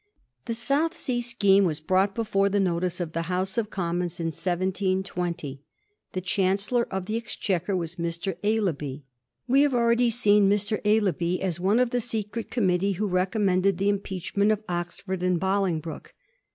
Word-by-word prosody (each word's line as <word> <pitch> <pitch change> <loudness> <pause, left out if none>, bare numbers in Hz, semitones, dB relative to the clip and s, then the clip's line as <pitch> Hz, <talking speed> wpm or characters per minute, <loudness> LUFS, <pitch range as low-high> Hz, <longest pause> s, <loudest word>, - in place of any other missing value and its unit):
The 230 - -2
South 285 +8 +1
Sea 245 -3 -1
scheme 200 -4 +3
was 160 -5 0
brought 190 +5 +1
before 200 -3 +1
the 200 +1 +1
notice 180 -1 0
of 165 -3 -4
the 165 - -1
House 185 +1 -1
of 225 -3 -1
Commons 175 -2 -2
in 165 -1 -1
1720. 180 -5 -2 0.5
The 185 - -2
Chancellor 195 +6 +1
of 190 -1 -3
the 215 +3 -2
Exchequer 200 -4 -2
was 170 0 -4
Mr. 170 +2 -3
Aislabie. 160 -10 -1 0.4
We 270 +3 +4
have 285 -3 +3
already 235 0 +3
seen 210 -4 +4
Mr. 205 +1 +1
Aislabie 190 -4 +1
as 180 -3 -2
one 200 +6 +2
of 250 -1 +2
the 245 - 0
secret 220 -1 -3
committee 195 -4 +1
who 205 +4 -2
recommended 185 0 +1
the 200 +2 +1
impeach 195 -3 -3
ment 205 +1 +4
of 215 0 -1
Oxford 175 +2 -4
and 180 -1 +1
Bolingbroke. 185 -4 -2
195 Hz, 165 wpm, -26 LUFS, 180-215 Hz, 0.5 s, We